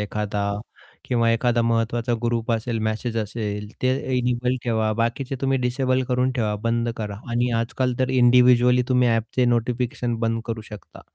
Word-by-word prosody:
एखादा 105 0 -2 0.6
किंवा 115 -2 +2
एखादा 120 0 +1
महत्त्वाचा 115 +1 0
ग्रुप 120 -1 -1
असेल, 115 0 -1
मॅसेज 110 +2 -2
असेल, 105 -1 -4
ते 130 - +3 0.3
इनेबल 125 0 0
ठेवा. 110 -2 +1
बाकीचे 120 +4 -2
तुम्ही 135 0 +1
डिसेबल 130 +1 0
करून 125 0 +1
ठेवा, 110 -4 -1
बंद 115 0 0
करा. 105 -2 -5
आणि 120 +1 +1
आजकाल 125 +2 -1
तर 130 - +1
इंडिव्हिज्युअली 125 0 +5
तुम्ही 125 -1 +3
ॲपचे 115 +2 +1
नोटिफिकेशन 120 +1 0
बंद 115 0 0
करू 115 -1 -3
शकता. 105 - -11
120 Hz, 150 wpm, -23 LUFS, 115-125 Hz, 0.6 s, इंडिव्हिज्युअली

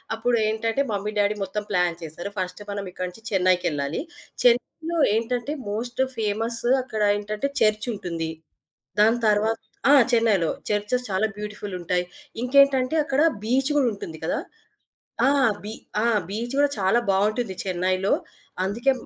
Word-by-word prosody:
అప్పుడు 235 +1 +1
ఏంటంటే 225 +4 0
mummy 205 +1 -2
daddy 205 +1 +2
మొత్తం 195 +2 -3
ప్లాన్ 180 -3 +1
చేశారు. 165 +4 -6
ఫస్ట్ 180 +1 -3
మనం 200 0 -3
ఇక్కడి 185 0 -4
నుంచి 200 +5 -15
చెన్నైకెళ్ళాలి. 175 - +1 0.4
చెన్నైలో 315 +7 +2 0.2
ఏంటంటే, 240 +4 -1 0.2
మోస్ట్ 240 +4 -2 0.2
ఫేమస్ 225 +2 -1 0.2
అక్కడ 220 -4 -4 0.2
ఏంటంటే 210 +5 -2
చర్చ్ 215 +1 +2
ఉంటుంది. 170 -5 -4 0.7
దాని 225 +3 +4
తర్వా 210 +1 +3 0.4
ఆ! - - +8 0.2
చెన్నైలో 220 -8 +3 0.2
చర్చెస్ 210 +4 0
చాలా 195 +3 +1
బ్యూటిఫుల్ 210 -1 -6
ఉంటాయి. 180 +1 0 0.4
ఇంకేంటంటే 270 +2 +4
అక్కడ 290 -1 +1 0.2
బీచ్ 260 +5 +2
గూడా 280 -4 +4
ఉంటుంది 165 -5 -7
గదా! - - 0 0.9
ఆ! - - +5 0.3
బీ 210 - -5 0.3
ఆ! - - +2 0.2
బీచ్ 230 +6 -4
కూడా 290 0 +4
చాలా 195 +5 +3
బావుంటుంది 210 +2 +1
చెన్నైలో. 185 +1 0 0.5
అందుకే 235 +8 +1
210 Hz, 135 wpm, -24 LUFS, 190-240 Hz, 0.9 s, ఆ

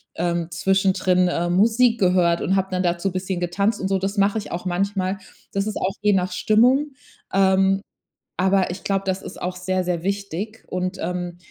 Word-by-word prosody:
ähm, 170 -1 -1
zwischendrin, 185 0 +2
ähm, 175 +1 -1
Musik 230 +4 +4
gehört 180 -2 +3
und 190 - +1
habe 190 0 0
dann 185 0 0
dazu 175 +2 0
bisschen 185 0 -3
getanzt 200 +5 0
und 190 - -2
so. 195 0 +1
Das 195 +2 -3
mache 200 +2 +2
ich 210 - -5
auch 175 +2 -5
manchmal. 190 +1 -1 0.4
Das 195 0 0
ist 215 - -3
auch 190 +1 -1
je 210 0 +3
nach 185 -1 +1
Stimmung. 250 +10 +3 0.4
Ähm, 195 0 +3 0.6
aber 190 0 +2
ich 180 +2 -6
glaube, 195 -1 -1
das 190 0 -1
ist - - -9
auch 180 +1 -3
sehr, 185 0 -1
sehr 175 -2 -2
wichtig. 200 +2 -4
Und, 185 +1 -3
ähm, 180 0 -3
190 Hz, 190 wpm, -22 LUFS, 180-200 Hz, 0.6 s, Musik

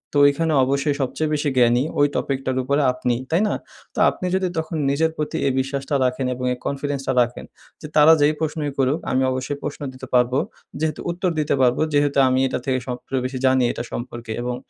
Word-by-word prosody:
তো 145 - +4
ওইখানে 155 +3 +2
অবশ্যই 140 +2 0
সবচেয়ে 150 +4 -1
বেশি 150 -1 0
জ্ঞানী, 120 +1 +4 0.2
ওই 145 - +5
টপিকটার 135 -1 -1
উপরে 140 +3 +1
আপনিই। 125 -1 -1
তাই 170 +5 +3
না? - - 0 0.4
তো - - -3
আপনি - - -6
যদি 190 -1 +1
তখন 160 +1 -2
নিজের 160 +3 +1
প্রতি 150 - -2
এই 135 - +1
বিশ্বাসটা 135 +1 -2
রাখেন 125 +1 -1
এবং 125 +1 -5
এই 125 - -7
কনফিডেন্সটা 140 -1 -2
রাখেন 120 0 -2 0.4
যে, 150 - -7
তারা 155 +2 +8
যেই 150 +1 +4
প্রশ্নই 155 -2 -2
করুক 135 +3 +1
আমি 130 +1 +2
অবশ্যই 130 +2 -3
প্রশ্ন 145 - -5
দিতে 130 0 -10
পারবো। 125 +1 +3 0.4
যেহেতু 155 -1 -2
উত্তর 180 +1 -1
দিতে 150 -2 +1
পারবো, 125 +3 +3
যেহেতু 145 -1 +2
আমি 130 0 +2
এটা 130 - -2
থেকে 130 -2 +1
সবচে 125 +2 -5
বেশি 130 0 -3
জানি, 130 -1 +4
এটা - - -5
সম্পর্কে 120 -2 -6
এবং 125 0 -2
140 Hz, 200 wpm, -22 LUFS, 130-150 Hz, 0.4 s, তারা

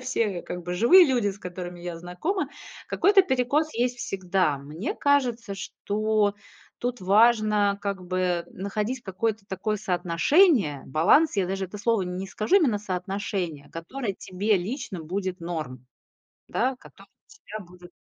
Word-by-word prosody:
все 255 -4 0
я, 175 - -5
как 180 - -6
бы, 175 +1 -4
живые 335 - +7
люди, 245 -7 +1
с 195 - -10
которыми 180 -1 -7
я 175 -1 -5
знакома. 180 - -2 0.4
Какой-то 395 0 +5
перекос 290 +1 +1
есть 245 +1 0
всегда. 185 -8 0
Мне 150 - -5
кажется, 245 -7 +1
что 210 +1 0 0.4
тут 245 0 -3
важно, 210 0 +4
как 200 -2 -3
бы, 180 -1 0
находить 210 +6 -3
какое-то 205 +2 -2
такое 210 +2 -2
соотношение, 185 - +3
баланс. 170 - +4
Я 195 -2 +2
даже 195 +1 -2
это 205 +3 -9
слово 225 -1 +1
н 180 0 -4
не 190 - -4
скажу, 215 - +1
именно 270 - +3
соотношение, 185 -5 -4
которое 200 +6 -5
тебе 200 +3 0
лично 195 - -4
будет 185 +2 -3
норм, 155 -7 -5 0.6
да, 255 +2 0
которое - - -16
у - - -53
тебя 435 - -9
будет. 180 0 -15
200 Hz, 150 wpm, -26 LUFS, 180-235 Hz, 0.6 s, живые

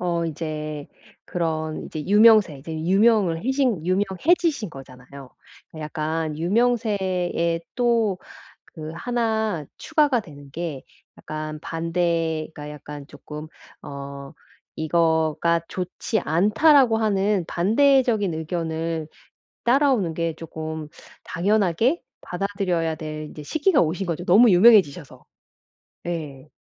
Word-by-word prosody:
어 170 -1 -1
인제 155 -2 -5 0.4
그런 160 -2 -3
이제 155 - -6
유명세 210 -7 +5
이제 160 +4 -8
유명을 185 +1 +2
해신 255 - +1
유명해지신 210 - +1
거잖아요. 135 0 -12 0.4
그 160 - -10
약간 155 0 -3
유명세에 190 -5 0
또 230 -6 +1 0.6
그 155 0 -6
1 220 -8 -1
추가가 300 -6 +2
되는 145 -8 -10
게 155 -3 -5 0.3
약간 155 0 -6
반대가 165 -2 -2
약간 145 -1 -9
쪼끔 150 +2 -9 0.4
어 140 0 -8 0.4
"이거가 160 +1 +1
좋지 185 +4 -3
않다."라고 225 - +4
하는 205 -3 +1
반대적인 225 - +2
의견을 160 -1 -3 0.6
따라오는 245 - +2
게 165 0 -1
조금 160 -1 -6 0.4
당연하게 210 - +1 0.2
받아들여야 180 -4 -2
될 155 -1 -6
이제 150 - -10
시기가 315 - +2
오신 175 +4 -2
거죠 175 0 -3
너무 220 +7 +6
유명해지셔서. 180 - +4 0.8
네. 150 -5 -5
170 Hz, 235 characters per minute, -23 LUFS, 155-215 Hz, 0.8 s, 너무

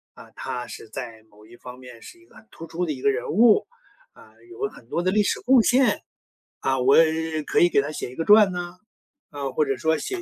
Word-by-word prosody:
啊， - - -15
他 125 -1 -6
是 115 - -11
在 115 -1 -8
某 105 +1 -20
一 115 +2 -16
方 125 +1 -12
面 125 -3 -13
是 350 - -14
一 345 - -22
个 - - -25
很 220 - -18
突 165 - -10
出 165 +2 -4
的 - - -2
一 135 - -6
个 140 - +3
人 135 - -4
物， 220 +4 +4 0.5
啊， - - -19 0.2
有 415 +3 -4
很 115 - -18
多 170 - -2
的 185 - +1
历 210 +2 +2
史 - - -1
贡 255 0 +5
献。 245 -3 +2 0.6
啊， 135 0 0
我 130 +2 +4 0.5
可 - - +1
以 175 - +5
给 - - +2
他 145 +2 -5
写 135 - -6
一 - - -13
个 165 - -3
传 210 -2 +6
啊， 175 +1 -7 0.5
啊， 140 -2 -5
或 155 - +1
者 135 -2 -2
说 160 +6 0
写 370 - -5
155 Hz, 260 characters per minute, -23 LUFS, 125-210 Hz, 0.6 s, 传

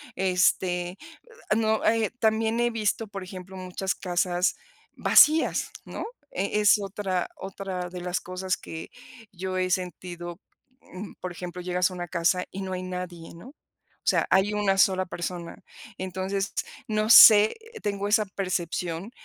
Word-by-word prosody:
este 180 -1 +1 0.6
no, 220 -1 +1
eh, 225 -1 +2
también 220 +1 +1
he 240 0 +2
visto, 225 0 -1
por 200 -1 -7
ejemplo, 185 0 -10
muchas 185 +1 -3
casas 180 0 0 0.4
vacías, 310 +2 +5
¿no?, - - -6 0.3
eh, 200 +3 -1
es 210 +1 +6
otra, 195 -2 -2
otra 190 -2 -5
de 180 0 -8
las 180 0 -2
cosas 185 +1 -3
que 160 - -8 0.4
yo 185 0 -4
he 185 0 0
sentido, 175 -1 -4 0.4
mm, 185 +2 -9
por 185 - -4
ejemplo, 180 0 -7
llegas 180 +1 +1
a - - -8
una 175 -1 -5
casa 180 +1 +1
y 195 - -6
no 190 - -4
hay 185 - -4
nadie, 180 -2 -7
¿no? 170 +9 -12
O 295 - -6
sea, - - +1
hay 190 +2 +3
una 200 -2 +1
sola 190 -1 +4
persona. 175 -1 -6 0.4
Entonces 190 +2 -3 0.3
no 215 0 0
sé, 215 - +9 0.3
tengo 200 -1 -2
esa 215 +1 +3
percepción 180 -1 -3
185 Hz, 145 wpm, -26 LUFS, 180-200 Hz, 0.6 s, sé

